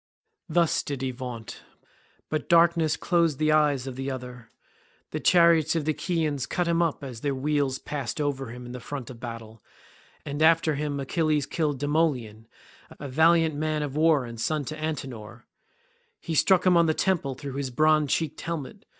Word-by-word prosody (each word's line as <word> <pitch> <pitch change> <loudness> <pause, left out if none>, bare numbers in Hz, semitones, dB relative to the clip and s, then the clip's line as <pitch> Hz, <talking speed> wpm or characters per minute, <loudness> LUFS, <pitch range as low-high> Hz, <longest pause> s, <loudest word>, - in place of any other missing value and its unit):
Thus 170 0 +2
did 140 -2 -5
he 130 - -1
vaunt, 125 -3 -7 0.7
but 155 - -3
darkness 165 -2 +4
closed 170 -5 +1
the 155 +1 +2
eyes 150 -4 +2
of 130 -2 -6
the 135 +1 -4
other. 125 -3 -7 0.6
The - - -3
chariots 170 -3 +4
of 160 -3 -1
the 155 - +2
Achaeans 155 -5 -2
cut 180 -1 -1
him 170 0 +2
up 165 -4 -1
as 125 -4 -7
their 140 -2 -1
wheels 140 -1 0
passed 140 -4 -5
over 140 -3 -2
him 125 +1 -9
in 120 - -8
the 125 - -6
front 130 0 -7
of 125 - -11
the - - -20
battle, 115 -2 -8 0.6
and 145 0 -4
after 160 0 +4
him 145 0 -3
Achilles 150 +1 0
killed 150 -4 -1
Demoleon, 140 -8 -1 0.5
a 145 - -6
valiant 160 +3 +3
man 155 +1 -1
of 145 -2 -5
war 155 -4 +3
and 115 -1 -8
son 155 0 -1
to 155 - -5
Antenor. 130 -7 -6 0.7
He 165 - -5
struck 180 +4 +3
him 185 -1 +5
on 170 -1 +5
the 155 - +1
temple 165 -9 0
through 140 +1 -7
his 140 -1 -3
bronze 155 +2 +2
cheeked 160 -3 -1
helmet. 170 +4 -6
145 Hz, 185 wpm, -26 LUFS, 130-160 Hz, 0.7 s, him